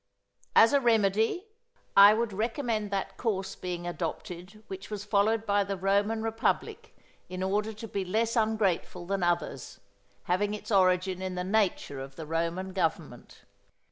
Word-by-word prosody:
As 225 +5 +7
a 280 - +5
remedy, 225 - +2 0.5
I 200 +2 +9
would 230 -2 -1
recommend 225 0 -1
that 195 -1 -3
course 195 -5 -2
being 175 -1 -5
adopted 180 +4 -6
which 190 0 -8
was 205 -1 -5
followed 215 +2 +2
by 205 -1 +2
the 195 0 -4
Roman 200 +4 +1
republic 225 0 -2 0.3
in 185 0 -4
order 210 +3 0
to 215 +2 -8
be 200 -2 -3
less 220 +5 0
ungrateful 215 -6 0
than 195 +1 -2
others, 175 -6 -2 0.4
having 205 +4 0
its 210 - -9
origin 185 -1 +2
in 185 -1 -3
the 180 - -2
nature 190 -8 0
of 135 0 -8
the 160 - -7
Roman 170 +4 -2
government. 165 -8 -3
195 Hz, 150 wpm, -29 LUFS, 180-220 Hz, 0.5 s, I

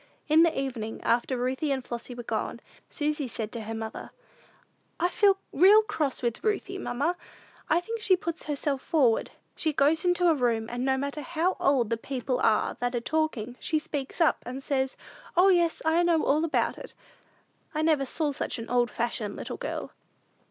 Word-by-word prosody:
In 310 +1 +6
the 330 -3 +3
evening, 240 -5 -4
after 240 +2 +1
Ruthie 260 +4 -1
and 265 -2 -2
Flossy 240 +1 -6
were 240 - -6
gone, - - -3 0.3
Susy 300 -1 -1
said 225 -2 -5
to 235 - -5
her 225 +1 -5
mother, 220 0 -6 0.9
"I 350 - +2
feel 400 0 +4 0.2
real 400 +7 +7
cross 295 -11 -2
with 235 -1 -1
Ruthie, 395 -2 -1
mamma: 295 +4 -1 0.5
I 330 +3 +3
think 455 +5 -5
she 395 -3 +4
puts 335 -2 -5
herself 285 -2 -1
forward. 260 -8 +2 0.3
She 315 -2 -1
goes 295 +3 +3
into 355 0 +3
a 335 - +6
room, 235 -5 0
and 245 +1 -3
no 265 0 +2
matter 280 +2 -3
how 345 +4 0
old 250 -5 +2
the 230 - +1
people 255 +1 -3
are 215 -4 +2
that 245 0 -1
are - - +1
talking, 250 -4 -2
she 315 - 0
speaks 290 -2 -4
up, 330 - +3
and 260 +2 -6
says, 265 -2 -1 0.4
'O, 370 +2 +7
yes, 345 -3 +2
I 320 +2 +4
know 340 -2 +3
all 300 +3 +2
about 330 - 0
it.' - - -11 0.8
I 310 - +1
never 310 -3 +3
saw 300 +2 0
such 275 - -3
an 230 0 -7
old 245 -1 +3
fashioned 225 -3 -2
little - - -6
girl." - - -5
280 Hz, 185 wpm, -27 LUFS, 245-330 Hz, 0.9 s, real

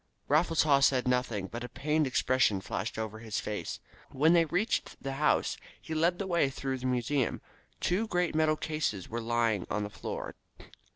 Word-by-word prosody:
Raffles 160 +3 +3
Haw 145 -3 +5
said 130 -2 +3
nothing, 125 -6 0
but 115 +5 -6
a 125 - -6
pained 150 +4 0
expression 130 -5 +2
flashed 95 +3 -4
over 110 0 -4
his 110 -2 -3
face. 105 -5 -4 0.3
When 155 +5 +3
they 170 -1 +5
reached 180 +8 -1
the 135 - -4
house 150 - +2 0.2
he 160 - -7
led 170 +3 +2
the 200 - -3
way 170 -6 +2
through 135 0 -3
the 130 - -2
museum. 125 +1 0 0.4
Two 200 +6 0
great 180 -4 0
metal 155 0 +2
cases 150 - -2
were 115 +1 -3
lying 115 -4 0
on 105 - -1
the 105 - -5
floor. - - -5
135 Hz, 180 wpm, -30 LUFS, 115-155 Hz, 0.4 s, Haw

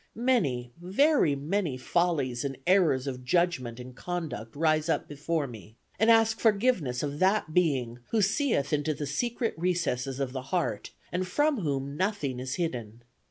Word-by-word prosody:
Many, 175 - +1
very 195 - +3
many 155 0 -1
follies 135 -4 0
and 135 -2 -3
errors 170 -8 +3
of 130 -2 -5
judgment 130 -5 0
and 125 0 -9
conduct 155 -11 -5
rise 155 +1 +2
up - - 0
before 150 +1 -2
me, 110 -4 -11 0.2
and 220 - +4
ask 225 -1 +5
forgiveness 200 - +2
of 145 0 -3
that 190 -3 +2
Being, 130 -9 +1
who 225 - +1
seeth 200 - +1
into 150 +1 0
the 145 - -4
secret 230 - -1
recesses 150 -7 -1
of 135 -2 -2
the 130 - -3
heart, 155 - -1 0.2
and 180 +1 -1
from 290 +6 +1
whom 140 -4 -2
nothing 185 -10 -1
is 130 +1 -3
hidden. 120 -9 -4
155 Hz, 160 wpm, -28 LUFS, 130-185 Hz, 0.2 s, ask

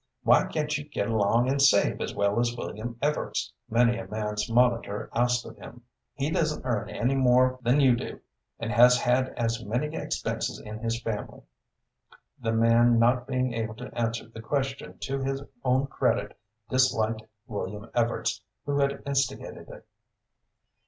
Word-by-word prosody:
"Why - - +5
can't 150 -1 -1
you 145 +1 -10
get 145 - -2
along 115 +2 +2
and 135 +1 +1
save 135 -7 +4
as - - -3
well 100 +2 +1
as 120 0 0
William 115 +1 -5
Evarts?" 150 +1 -1 0.2
many 120 0 +3
a 115 - -7
man's 105 0 -3
monitor 120 -3 +1
asked 120 0 +1
of - - -10
him. 120 - -12 0.3
"He 145 +2 -1
doesn't 155 -4 0
earn 110 -5 -1
any 120 +5 0
more 130 -1 +3
than 125 +4 +3
you 130 -4 +5
do, - - -6 0.4
and 115 0 -4
has 125 +3 +7
had 130 +1 +2
as 115 -1 -1
many 125 +9 -2
expenses - - -3
in 105 0 -8
his 115 0 -2
family." 115 -3 -5 1.0
The 115 -1 0
man 115 +1 +4
not 125 +2 +3
being 130 -2 0
able 110 -1 -3
to 125 +2 -9
answer 115 0 -2
the 115 0 -10
question 135 +2 -3
to 135 0 -2
his 135 +1 -2 0.2
own 130 +1 +2
credit, 135 - -1 0.3
disliked 115 -4 +1 0.2
William 105 0 -5
Evarts 120 -1 0 0.2
who 145 0 0
had 140 0 0
instigated 140 -1 -2
it. - - -12
120 Hz, 160 wpm, -27 LUFS, 115-130 Hz, 1.0 s, has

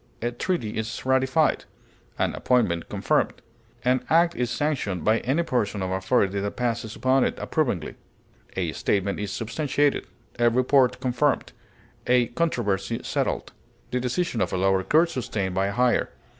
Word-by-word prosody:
A 120 - 0
treaty 120 - -2
is 110 +3 -5
ratified; 130 +4 +2 0.5
an - - 0
appointment 105 -10 +1
confirmed. - - +1 0.5
An 125 +1 +2
act 170 +1 +4
is 125 -1 -1
sanctioned 120 - -1
by 110 +1 +4
any 145 +7 0
person 105 - -1
or 95 0 -1
authority 100 0 +1
that 100 +1 -3
passes 115 -3 -2
upon 130 0 +3
it - - -1
approvingly. 120 - -1 0.6
A - - -1
statement 100 0 -1
is 105 -1 -3
substantiated; 145 +5 0 0.3
a 120 0 +5
report 130 +2 +3
confirmed; 130 +2 0 0.5
a 125 -1 +4
controversy 115 - -1
settled; - - -2 0.4
the 125 - 0
decision 125 - -1
of 90 - 0
a - - -1
lower 95 0 +2
court 160 - +3
sustained 100 - -2
by 95 +1 +1
a - - -2
higher. 125 +4 +2
120 Hz, 150 wpm, -25 LUFS, 100-130 Hz, 0.6 s, a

